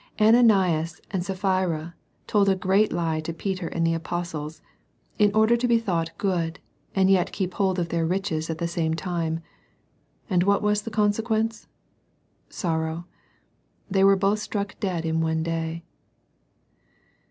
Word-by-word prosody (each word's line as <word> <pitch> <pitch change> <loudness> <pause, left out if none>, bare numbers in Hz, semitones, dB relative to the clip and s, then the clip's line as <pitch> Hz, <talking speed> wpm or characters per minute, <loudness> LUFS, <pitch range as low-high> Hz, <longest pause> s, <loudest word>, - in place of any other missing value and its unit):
Ananias 195 -8 +4
and 185 -3 -1
Sapphira 185 -4 -1 0.3
told 200 -2 +3
a 190 - +3
great 190 +3 +2
lie 165 -2 -1
to 155 +1 -4
Peter 185 +1 -3
and 165 0 -1
the 165 - +2
Apostles, 165 -2 -4 0.6
in 210 -1 +5
order 220 +2 +5
to 240 +1 0
be 235 -1 +4
thought 175 -7 -1
good, 170 -4 -1 0.4
and 190 -1 +4
yet 190 -2 +3
keep 185 -2 -3
hold 190 -2 +1
of 170 -2 -1
their 165 0 0
riches 165 -2 -1
at 160 - -2
the 170 - -1
same 165 -2 -1
time. 165 -1 -2 0.9
And 185 -6 +2
what 200 +2 +2
was 210 0 +2
the 230 - -6
consequence? 220 +1 0 0.8
Sorrow, 160 -1 -2 0.9
They 195 0 +3
were 195 0 +7
both 195 +2 +1
struck 205 -1 -3
dead 180 -5 -2
in 160 0 0
one 160 0 0
day. 165 0 -3
180 Hz, 150 wpm, -25 LUFS, 165-200 Hz, 0.9 s, were